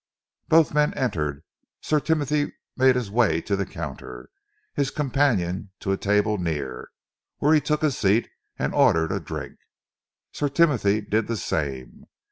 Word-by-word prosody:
Both 160 -3 +4
men 150 0 +2
entered. 75 - -2 0.4
Sir 155 - +1
Timothy 150 -1 0 0.2
made 130 -1 +4
his 120 -6 -2
way 105 -8 +3
to 100 - -1
the 100 0 -2
counter, - - -8 0.4
his 140 -2 0
companion 120 - 0
to 95 - -2
a - - +2
table 105 +1 +1
near, 75 -7 -4 0.5
where 150 +2 +3
he 155 - +5
took 150 +1 -1
a 155 - +3
seat 110 -2 +2 0.3
and - - -2
ordered 80 +2 +3
a 95 - -1
drink. 75 -3 -7 0.7
Sir 145 - -1
Timothy 125 -10 +2
did 105 +1 -1
the 115 - -2
same. 70 -8 -4
105 Hz, 150 wpm, -24 LUFS, 85-145 Hz, 0.7 s, he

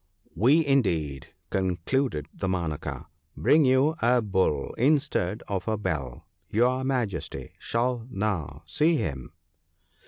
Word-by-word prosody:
We, 140 - +4
indeed,' 85 - +1 0.2
concluded 95 - 0
Damanaka, 85 -6 -3 0.2
* - - -36
bring 155 -1 +4
you 130 +4 +4
a 125 +1 +4
Bull 95 -9 0
instead 135 - +1
of 95 -2 -3
a 110 -1 +1
bell 75 -11 -4
— - - -50
your 125 +4 +2
Majesty 125 -7 -3
shall 120 0 -1
now 90 - -3
see 150 - +2
him 70 - -3
105 Hz, 120 wpm, -27 LUFS, 85-130 Hz, 0.2 s, We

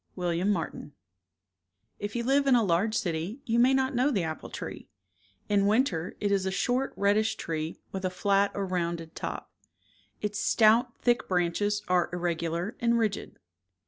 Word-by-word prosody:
— - - -38
IVllar, 175 +1 0
Martin 165 -6 -3 1.1
If 205 +2 -5
you 235 - -1
live 275 +3 +2
in 265 - +6
a 235 - +4
large 200 +4 +1
city 175 - -2
you 230 0 +1
may 250 +2 +5
not 265 0 +1
know 255 +3 +2
the 205 -11 0
apple 160 -1 -5
tree. - - -7 0.6
Inwinter 205 - +2
it 205 -1 0
is 195 -1 +1
a - - 0
short 250 +7 0
reddish 205 +2 +2
tree, 160 0 -4
with 190 0 -5
a 185 - +1
flat 200 +2 +2
or 200 - -1
rounded 170 -3 -3
top. - - -6 0.7
Its 210 0 -3
stout 230 +3 +4
thick 240 0 +2
branches 195 +4 0
are 180 -1 +2
irregular 170 +1 -2
and 235 0 +2
rigid. 215 -3 -2
200 Hz, 165 wpm, -28 LUFS, 175-230 Hz, 1.1 s, in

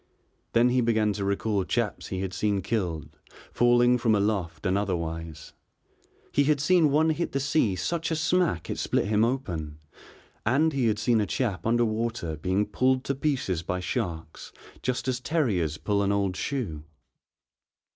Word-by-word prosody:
Then 120 +1 +5
he 125 0 +2
began 110 -3 +2
to 100 0 -4
recall 100 0 0
chaps - - -2
he 95 -1 -3
had 95 -1 -4
seen 100 0 0
killed, 85 - -3 0.3
falling 120 0 +4
from 115 -2 +3
aloft 100 -4 -1
and 95 0 +2
otherwise. 80 -5 -3 0.8
He 145 - +2
had 150 0 +2
seen 165 +1 +4
one 155 +3 +3
hit 170 +2 -2
the 135 - +1
sea 135 -7 +1
such 165 - -2
a 165 - 0
smack 160 - +1
it - - -4
split - - 0
him 105 +1 +2
open, 90 - -2 0.7
and 145 +8 +2
he 130 -4 +1
had 110 -1 +1
seen 115 +1 +2
a 105 - -1
chap 115 -6 -2
under 120 +1 +3
water 110 -7 -2
being 95 +7 0
pulled 130 +4 +1
to 140 - -1
pieces 135 - -1
by 90 +2 -3
sharks 85 -4 -4 0.3
just 125 +1 -2
as 125 -1 0
terriers 110 - 0
pull 100 +3 0
an 100 0 +1
old 100 -2 0
shoe. 90 - -3
110 Hz, 165 wpm, -27 LUFS, 95-130 Hz, 0.8 s, Then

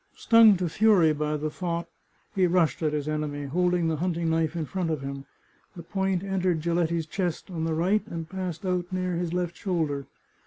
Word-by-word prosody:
Stung 225 -3 +6
to 180 0 -1
fury 180 -3 +4
by 150 0 -1
the 155 +1 -3
thought, 170 0 -3 0.5
he 190 -3 +3
rushed 170 -5 +2
at 155 -2 +1
his 150 -1 -2
enemy, 150 -1 -2
holding 175 +3 +1
the 160 -1 0
hunting 170 0 -1
knife 160 0 0
in 165 -2 -2
front 180 0 -2
of 155 -3 -2
him. 140 0 -6 0.5
The 170 - -8
point 190 0 -1
entered 185 -3 0
Giletti's 170 -1 0
chest 175 +2 -3
on 160 -2 -2
the 160 -1 0
right, 190 +6 +2
and 165 -1 -5
passed 185 0 -5
out 180 -1 -1
near 185 -1 -1
his 170 -1 -2
left 175 -1 -2
shoulder. 155 -7 -2
170 Hz, 195 wpm, -27 LUFS, 155-185 Hz, 0.5 s, Stung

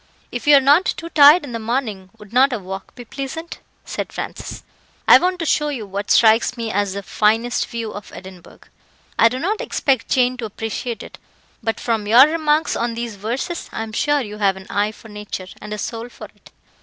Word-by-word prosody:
"If 245 +3 -6
you 295 - +8
are - - +4
not 290 +7 +5
too 335 - -3
tired 300 +2 +7
in 280 - -8
the 230 - -4
morning, 220 -5 -3
would 210 0 -15
not 265 +3 +5
a 245 - -1
walk 190 -1 -8
be 245 - -10
pleasant?" 275 +7 -6 0.3
said - - -5
Francis. - - -7 0.4
"I - - +9
want 365 +1 0
to 335 - -3
show 300 -1 +1
you 250 -7 -4
what 200 +1 -5
strikes 225 +2 +4
me 230 -2 -3
as 200 -1 0
the 200 0 -5
finest 225 +5 +1
view 230 -2 -5
of 205 - -9
Edinburgh. 185 -1 -12 0.6
I 230 - +7
do 250 - -4
not 395 +10 -2
expect 265 -4 0
Jane 250 0 +2
to 240 - -4
appreciate 225 +2 -5
it; - - -12 0.4
but 225 - -2
from 225 -3 -1
your 240 +5 +8
remarks 310 0 +1
on 235 -1 -2
these 235 -2 -5
verses, 240 - -4
I - - -4
am 220 - -8
sure 290 +6 +1
you 210 -3 -7
have 195 -2 +2
an 190 - -11
eye 205 +1 +1
for 220 - -15
nature, 210 -3 -7 0.2
and 210 - -9
a 210 - -3
soul 230 +3 -5
for - - -11
it." - - -20
230 Hz, 215 wpm, -20 LUFS, 210-275 Hz, 0.6 s, I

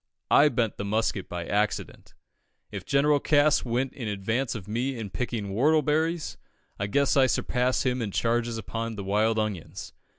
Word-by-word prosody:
I 150 +1 +6
bent 115 -6 -1
the - - -4
musket 100 -2 -1
by 85 -1 -4
accident. 105 +3 -2 0.6
If - - -7
General 145 +1 +3
Cass 145 +1 +3
went 125 +2 -1
in 120 -5 -6
advance 110 +6 -2
of 100 -4 -7
me 125 +5 -2
in 105 -4 -6
picking 115 -4 -3
whortleberries, 155 - +1 0.4
I 105 - -1
guess 140 +7 +2
I 135 -2 +5
surpassed 125 +1 0
him 125 -1 0
in 110 - -2
charges 115 +2 0
upon 115 +1 -4
the 100 - -5
wild 105 +3 +1
onions. 105 -6 -4
115 Hz, 165 wpm, -27 LUFS, 105-135 Hz, 0.6 s, I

